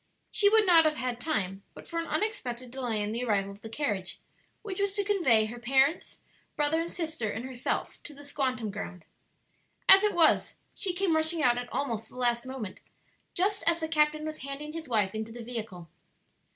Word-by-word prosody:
She 405 - +5
would 435 0 +5
not 340 -3 +7
have 305 -1 +2
had 250 -4 -3
time 200 - -2
but - - -12
for 335 - -3
an 330 - -3
unexpected 255 - -2
delay 240 -5 -1
in 205 - -2
the 235 +3 -2
arrival 200 -4 0
of 200 +1 -13
the 225 - -8
carriage 210 -8 -3 0.4
which 400 -2 -4
was 400 0 0
to 405 - +1
convey 325 - +3
her 235 +3 -7
parents, 270 +7 +1 0.3
brother 300 +2 +2
and 335 - -4
sister 320 -10 -3
and 225 +4 -4
herself 255 -2 -3
to 295 - -10
the 285 - -11
"squantum" 255 -6 -2
ground. 180 -4 -7 0.8
As 385 +1 +9
it 415 -3 +2
was, 330 -2 +4 0.2
she 385 -4 -1
came 355 -2 +1
rushing 315 0 +1
out 245 -1 +4
at 245 0 -7
almost 230 -6 -2
the - - -14
last 240 0 +1
moment, 245 -8 -6 0.6
just 395 +3 +1
as 335 0 +4
the 320 - -1
captain 305 -1 +2
was 310 0 -5
handing 280 +3 -6
his 325 -2 -6
wife 210 -5 +1
into 220 +1 -4
the 235 +1 -8
vehicle. 220 -8 -6
265 Hz, 200 wpm, -29 LUFS, 230-330 Hz, 0.8 s, As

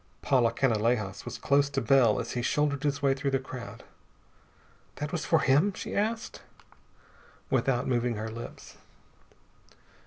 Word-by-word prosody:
Paula 120 -4 +3
Canalejas 115 -4 0
was - - -6
close 140 0 +2
to 140 -1 -1
Bell 130 -6 +4
as - - -4
he 125 - -2
shouldered 145 +2 0
his 145 0 -1
way 135 -1 +4
through 135 +1 -2
the 135 - +2
crowd. 120 -4 -9 1.1
"That 150 0 -4
was 175 - -3
for 160 -2 +3
him?" 150 +9 +3
she - - -6
asked, 220 +2 -2 1.1
without 125 -2 +1
moving 120 -2 0
her 110 +1 -5
lips. 115 +1 -9
135 Hz, 145 wpm, -28 LUFS, 120-145 Hz, 1.1 s, Bell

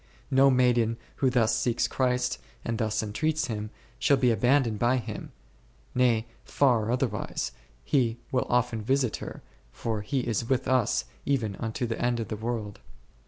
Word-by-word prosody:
No 135 +1 +6
maiden 120 -3 +3 0.2
who 135 - +3
thus 120 -3 +3
seeks 120 -1 +1
Christ 125 -1 0 0.3
and 115 -1 -2
thus 110 -1 0
entreats 155 +9 0
Him, 105 -2 -4 0.3
shall 140 - +4
be 125 -2 +3
abandoned 120 0 +2
by 120 +2 +3
Him; 120 - -6 0.6
nay, 120 -3 +3 0.2
far 120 -5 +2
otherwise, 125 -6 -1 0.3
He 120 - +1
will 125 - +1
often 120 -2 +1
visit 130 +1 +1
her, - - -8 0.3
for 110 - -3
He 130 +6 -1
is 115 -1 -2
with 130 -1 +1
us 130 -4 +2 0.2
even 115 -8 0
unto 115 +2 -2
the 115 -1 -3
end 120 -1 +1
of 110 - -4
the - - -2
world. 110 -2 -4
120 Hz, 160 wpm, -28 LUFS, 110-130 Hz, 0.6 s, No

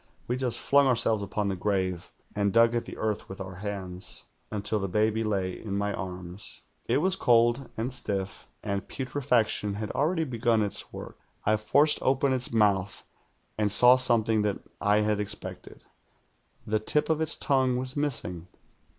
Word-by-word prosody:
We 125 - 0
just 125 -2 0
flung 140 0 +4
ourselves 115 -4 +2
upon 100 +1 -2
the 95 - -1
grave, 95 -2 -2 0.3
and 100 -1 +1
dug 115 +1 +4
at 120 - -1
the - - -9
earth 110 -1 -3
with 95 - -8
our 95 -2 -7
hands, 95 -2 -5 0.3
until 105 0 -1
the 100 - -2
baby 110 +3 +1
lay 95 -4 -1
in 100 -3 -4
my 100 0 -1
arms. 90 +1 -7 0.3
It 120 - +2
was 185 +2 +3
cold 120 -1 +2
and 120 +4 -2
stiff, 100 -6 -2 0.2
and 100 -2 -3
putre 135 +2 -5
faction 110 -4 +1
had 105 0 -4
already 160 +4 0
begun 115 -5 +1
its 100 - -4
work. - - -9 0.3
I 110 - +3
forced 145 +8 +3
open 135 +1 +2
its 125 -1 -1
mouth, 100 -4 +1 0.6
and 105 -1 +2
saw 125 +4 +8
something 115 -4 +3
that 105 -2 0 0.2
I 105 +1 +3
had 105 -1 0
expected. 105 - -5 0.8
The 110 0 0
tip 150 +7 +2
of 160 0 0
its 160 0 +2
tongue 130 -3 +1
was 130 +1 -3
missing. 95 - -2
110 Hz, 170 wpm, -27 LUFS, 100-125 Hz, 0.8 s, saw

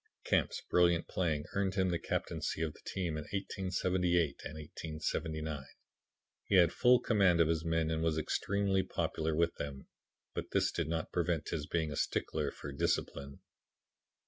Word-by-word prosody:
"Camp's - - +1
brilliant 85 -1 +3
playing 80 -5 0
earned 100 -1 0
him 95 -1 +2
the 85 -1 0
captaincy 80 - -2
of 80 -2 -2
the - - -17
team 85 -5 -2
in - - -3
1878 90 -4 0
and 75 - -6
1879. 75 -1 -4 0.8
He 100 - +1
had 85 -3 +6
full 125 0 +5
command 95 -6 +3
of 85 - +5
his 80 -1 +1
men 80 -1 +1
and 80 0 0
was 80 -1 +1
extremely 95 +4 +1
popular 80 -3 -1
with 85 +1 +2
them, 70 -2 -5 0.5
but - - -4
this - - +3
did - - -2
not 80 -1 -2
prevent 85 -3 0
his 75 -3 -3
being 80 -3 0
a - - -4
stickler - - -1
for 70 - -8
discipline. 70 0 -2
80 Hz, 160 wpm, -33 LUFS, 75-90 Hz, 0.8 s, had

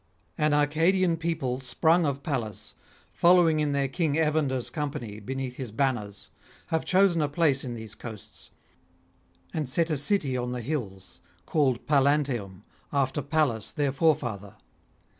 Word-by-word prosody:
An 150 0 +1
Arcadian 165 +5 +2
people 160 -6 -2
sprung 160 +6 +2
of 140 0 -3
Pallas, 115 - -4 0.4
following 170 -3 +4
in 150 -1 +1
their 140 -1 +1
king 150 +1 -1
Evander's 150 -5 0
company 140 -9 -4
beneath 130 +3 -5
his 125 -5 -5
banners, 110 -5 -2 0.4
have 160 -1 0
chosen 185 -3 +3
a 150 - 0
place 145 -3 +2
in 125 -3 -5
these 110 -2 -8
coasts, 110 -2 -10 1.0
and 150 -5 -2
set 165 +5 +1
a 150 - +1
city 145 -3 +1
on 125 0 -2
the 125 - -4
hills, 100 - -5 0.3
called 135 -6 +1
Pallanteum 140 -9 +1 0.3
after 140 0 0
Pallas 140 -8 0
their 145 -2 0
forefather. 125 - 0
140 Hz, 140 wpm, -27 LUFS, 125-155 Hz, 1.0 s, following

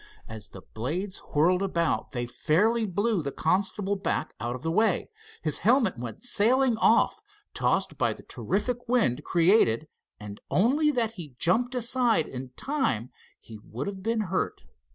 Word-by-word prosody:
As 110 -1 -7
the 95 - -12
blades 175 - -3 0.2
whirled 180 +5 +4
about 170 -4 0
they 120 -2 -3
fairly 205 - +1
blew 205 +1 0
the 140 -2 -4
constable 195 +5 0
back 190 -5 -2
out 120 +1 -3
of 125 - -9
the 160 - -1
way. 220 - +1 0.3
His 155 -2 0
helmet 230 - +3
went 120 - -7
sailing 250 +2 +3
off, 230 - +3 0.3
tossed - - 0
by - - +2
the - - -15
terrific 240 +4 -3
wind 180 - +2
created 165 - +3 0.3
and, 105 -1 -9
only 275 - +3
that 240 -6 0
he 165 - -9
jumped 245 - +1
aside 240 -6 +2
in 130 0 -7
time 260 - -1 0.3
he 110 -2 -12
would 120 +5 -6
have 195 -1 -5
been 225 +2 0
hurt. 190 -2 -2
190 Hz, 155 wpm, -27 LUFS, 140-230 Hz, 0.3 s, whirled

